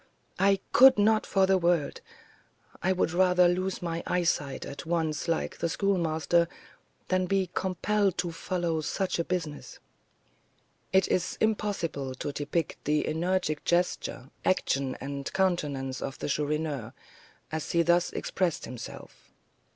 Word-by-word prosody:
I 195 0 +4
could 265 0 +8
not 215 +1 +3
for 195 -1 +3
the 190 0 +3
world. 170 -4 +1 0.8
I 185 - +2
would 185 -3 +1
rather 180 0 +4
lose 185 +1 -1
my 170 -1 -2
eyesight 165 -6 0
at 140 - -7
once, 160 -2 -1
like 165 -1 -1
the 170 - 0
Schoolmaster, 170 -3 +1 0.6
than 185 0 +1
be 190 -1 0
compelled 190 +1 0
to 180 -1 -1
follow 165 -1 -2
such 185 +4 -1
a - - +2
business." 165 -4 -4 1.1
It 190 -1 +4
is 180 - 0
impossible 185 -11 -1
to 145 - -4
depict 145 +3 -3
the 150 +1 +1
energetic 160 -1 0
gesture, 165 -6 -1
action, 140 -7 0
and 140 0 -5
countenance 145 -8 0
of 135 - -4
the - - -4
Chourineur, 150 -4 -2 0.6
as 155 -1 -3
he 170 0 +3
thus 175 +1 +3
expressed 180 -4 -1
himself. 120 -2 -10
170 Hz, 135 wpm, -28 LUFS, 150-185 Hz, 1.1 s, could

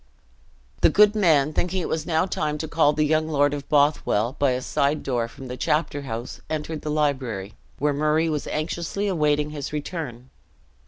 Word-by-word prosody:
The - - +6
good 210 0 +5
man, 155 -8 +3
thinking 180 +4 -1
it 175 - -2
was 160 - -2
now 160 +1 +2
time 150 -5 -2
to 160 - -4
call 155 -2 +3
the 150 0 +1
young 155 +1 +1
lord 145 -2 +2
of 140 -1 -6
Bothwell, 140 -5 +2
by 140 - +3
a 125 - -2
side 140 +4 0
door 120 -3 -1
from 130 +3 -11
the 125 - -5
chapter 150 +2 0
house 120 -2 -6
entered 155 0 -3
the 150 - -4
library, 130 -10 -1 0.2
where 145 +1 +1
Murray 155 +3 +2
was 150 -2 -2
anxiously 170 +5 -2
awaiting 150 -4 +1
his 145 -3 -5
return. 145 -5 -5
150 Hz, 180 wpm, -24 LUFS, 140-160 Hz, 0.2 s, The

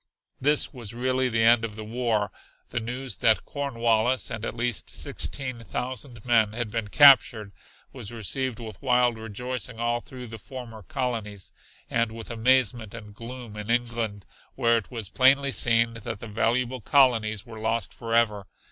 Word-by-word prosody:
This 145 +3 +3
was 115 -4 -8
really 130 +1 +1
the 115 -1 +1
end 115 0 +5
of 110 -2 -4
the 110 - -6
war. 110 -3 -1 0.4
The - - -2
news 125 0 -5
that 110 -1 +3
Cornwallis 120 -3 0
and 110 0 -5
at - - -3
least 120 -1 -1
sixteen 130 -4 -4
thousand 120 +1 -5
men 115 -3 +3
had 115 -2 -3
been 115 -2 -2
captured 120 -5 +6 0.4
was 100 - -8
received 120 +2 -3
with 110 -4 -9
wild 125 -3 +2
rejoicing 125 +2 -5
all 120 0 +1
through 125 0 -10
the 115 -1 -9
former 120 -2 -9
colonies, 105 -2 -4 0.3
and 115 -1 0
with 115 +1 -7
amazement 120 -2 +2
and 105 -3 -10
gloom 115 0 -9
in 105 +1 -7
England, 115 -4 -1 0.3
where 115 -3 +3
it 115 -3 -2
was 115 -5 -5
plainly 135 +5 +4
seen 115 -2 +3
that 115 -3 -6
the 115 - -9
valuable 120 +4 0
colonies 115 -6 +3
were 115 -2 -10
lost 115 +1 -1
forever. 115 -4 0
115 Hz, 160 wpm, -26 LUFS, 110-125 Hz, 0.4 s, captured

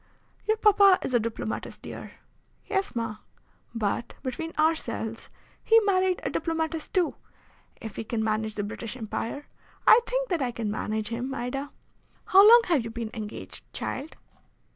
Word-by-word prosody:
"Your 435 0 +3
papa 400 -3 +6
is 255 - -3
a 240 - +5
diplomatist, 225 -1 -4
dear." - - -8 0.5
"Yes, 390 - -1
ma." 225 -2 -2 0.6
"But, 225 +1 -2
between 305 +5 -4
ourselves, 305 -8 0 0.3
he 455 0 +6
married 375 -3 +2
a - - -2
diplomatist 325 -1 -2
too. 365 -3 +1 0.6
If 220 -3 -8
he - - -3
can 220 0 -2
manage 220 0 -1
the 205 - -2
British 225 +3 -6
Empire, 230 +5 -4 0.4
I 450 - +9
think - - -1
that 345 -5 0
I 255 - +1
can 230 -3 -3
manage 215 0 -2
him, 245 +3 -3
Ida. 275 +3 -3 0.6
How 385 - +7
long 475 +1 +9
have 320 -9 +2
you 230 - -5
been 225 -1 -5
engaged, 215 -2 -7
child?" 285 +4 -4
255 Hz, 155 wpm, -27 LUFS, 225-360 Hz, 0.6 s, I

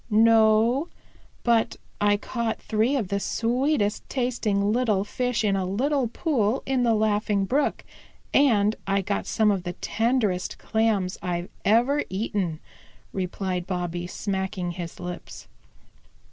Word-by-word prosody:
"No, 225 +5 +4 0.6
but 230 -2 +2 0.3
I 205 0 +4
caught 230 +1 -3
three 225 +6 +1
of 220 -9 -1
the 200 0 0
sweetest 235 0 0
tasting 225 -6 0
little 220 -5 +2
fish 245 +1 -1
in 200 -2 +2
a 190 - 0
little 255 +8 0
pool 240 -3 0
in 265 -1 +1
the 235 -2 +3
Laughing 210 -1 +1
Brook, 275 +8 0 0.5
and 220 -6 +4
I 195 0 +1
got 200 +1 -2
some 215 -1 +3
of 195 -2 0
the 175 0 -5
tenderest 225 -6 0
Clams 220 -5 0
I've 175 0 -3
ever 245 +7 +3
eaten," 190 -5 -2 0.5
replied 185 -1 -3
Bobby, 175 -1 -3
smacking 190 -2 -3
his 175 -1 -7
lips. 180 0 -8
210 Hz, 130 wpm, -25 LUFS, 190-235 Hz, 0.6 s, No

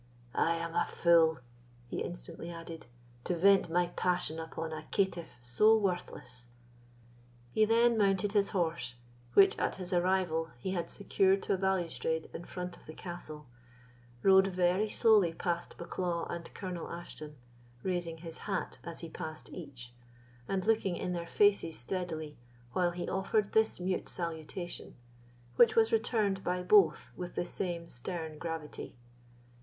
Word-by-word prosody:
"I 170 - +2
am 165 0 -4
a - - +3
fool," 165 -2 +4 0.5
he - - -4
instantly - - -5
added, 165 -3 -8 0.4
"to 180 - 0
vent 190 +1 +5
my 175 +2 +3
passion 180 -3 0
upon 160 0 -5
a 155 0 -7
caitiff 190 -4 0
so 210 - +5
worthless." 125 - -3 1.0
He 215 - +4
then 230 +1 +4
mounted 195 0 +2
his 200 -2 +3
horse, 165 -8 -1 0.4
which 195 - +7
at - - 0
his 185 -1 -5
arrival 175 -2 +1
he 155 +10 -3
had 175 -3 -2
secured 195 -1 +2
to - - +1
a - - +1
balustrade 175 -4 -1
in 170 - -6
front 180 -1 -6
of - - -20
the 155 - -9
castle, 155 -4 -7 0.8
rode 190 0 +7
very 185 +3 +2
slowly 210 -7 +4
past 170 0 -2
Bucklaw 170 0 -2
and 170 -1 -6
Colonel 180 -3 -5
Ashton, 155 -3 -8 0.5
raising 175 -3 -2
his 165 0 -8
hat 195 - -2
as 170 -1 -6
he 165 - -5
passed 155 -1 -7
each, 130 -7 -9 0.5
and 190 -1 -1
looking 215 -5 +2
in 180 -1 -2
their 170 -1 -4
faces 200 -6 +3
steadily 160 +1 -4 0.4
while 180 -1 +2
he 175 0 -4
offered 195 +2 0
this 220 -3 +2
mute 185 +1 -1
salutation, 170 +1 -5 0.6
which 235 - +6
was 225 0 +4
returned 215 -4 +1
by 180 0 -1
both 180 -4 +4
with 180 -1 -6
the - - -1
same 175 -2 -3
stern 160 +4 -5
gravity. 165 -3 -5
175 Hz, 150 wpm, -32 LUFS, 165-190 Hz, 1.0 s, which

